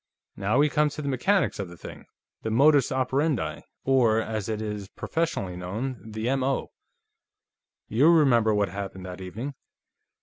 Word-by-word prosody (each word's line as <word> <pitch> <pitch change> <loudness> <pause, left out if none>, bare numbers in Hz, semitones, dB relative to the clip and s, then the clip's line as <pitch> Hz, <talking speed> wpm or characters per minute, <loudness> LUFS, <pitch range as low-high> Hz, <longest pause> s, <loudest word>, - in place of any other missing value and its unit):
"Now, 105 +5 0
we 145 +1 +5
come 150 0 +2
to 150 +1 -6
the - - -3
mechanics 185 - +1
of 100 -3 -4
the 85 - -12
thing; - - -10 0.4
the 110 - -3
modus 140 +4 +4
operandi, 130 - 0 0.2
or, 120 -5 +3
as 110 -2 -3
it 110 -1 -2
is 105 -2 -4
professionally 105 - -2
known, 110 +8 -4
the 110 +1 -4
M.O. 135 0 0 1.2
You 135 +9 +4
remember 130 -9 +5
what 105 -2 +1
happened 95 -1 -6
that 90 0 -7
evening. 110 +10 -5
115 Hz, 155 wpm, -26 LUFS, 100-140 Hz, 1.2 s, we